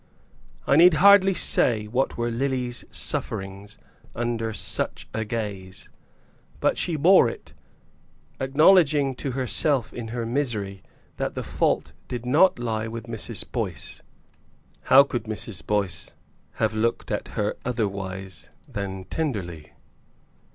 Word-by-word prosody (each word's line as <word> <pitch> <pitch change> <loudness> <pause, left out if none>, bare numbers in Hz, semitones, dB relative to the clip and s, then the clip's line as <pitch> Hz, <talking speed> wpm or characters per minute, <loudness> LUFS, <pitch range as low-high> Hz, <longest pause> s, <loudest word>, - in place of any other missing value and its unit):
I 140 - +3
need 175 0 +7
hardly 195 +3 +6
say 110 -9 +3
what 125 +5 -1
were 120 0 -1
Lily's 125 0 -2
sufferings 100 0 -3 0.4
under 115 -1 -2
such - - -2
a 110 - -1
gaze; 100 -4 -5 0.7
but - - +2
she 170 - -2
bore 165 -4 +5
it, - - -11 0.9
acknowledging 145 0 +4
to 135 - -3
herself 130 +1 0
in 120 -2 -6
her 115 +1 -4
misery 110 -7 -2 0.4
that - - -3
the - - -3
fault - - -1
did 120 -1 -5
not 155 +9 +4
lie 110 -2 -2
with 115 +1 -7
Mrs. 115 -2 -5
Boyce. - - -4 0.8
How 135 +2 +8
could 120 -5 -4
Mrs. 110 -2 -6
Boyce 100 -5 -2 0.4
have 110 -1 0
looked 115 +2 -1
at - - -2
her 105 0 0
otherwise 95 -6 -4 0.2
than 95 -2 -5
tenderly? 95 - -4
115 Hz, 125 wpm, -24 LUFS, 105-135 Hz, 0.9 s, How